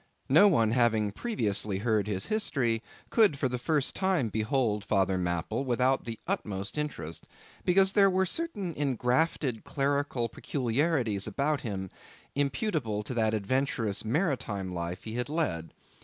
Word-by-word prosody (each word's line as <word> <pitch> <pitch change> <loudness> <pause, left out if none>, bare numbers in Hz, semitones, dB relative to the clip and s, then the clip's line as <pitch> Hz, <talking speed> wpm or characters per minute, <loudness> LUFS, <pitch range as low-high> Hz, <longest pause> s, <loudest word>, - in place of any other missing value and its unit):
No 205 - +7
one 115 - +3
having 115 -4 +2
previously 105 - -1
heard 105 -1 +1
his 95 -3 -1
history, 135 - 0 0.3
could 210 -11 +4
for 135 - +1
the 125 -1 -3
first 150 +1 0
time 185 - +1
behold 110 0 0
Father 95 -2 +2
Mapple 90 - -1
without 130 +1 +1
the 115 -1 -4
utmost 100 -1 -3
interest, 110 - -4 0.4
because 190 +2 +4
there 200 -2 +6
were 190 0 +2
certain 205 - -3
engrafted 130 -1 0
clerical 140 -3 0
peculiarities 125 - 0
about 140 +8 0
him, 95 -5 -4 0.4
imputable 140 - -1
to 115 - -5
that 110 -2 +1
adventurous 115 -1 -1
maritime 115 - -1
life 85 +1 -4
he 110 - -6
had 125 +3 -2
led. 145 - -1
120 Hz, 140 wpm, -29 LUFS, 105-150 Hz, 0.4 s, No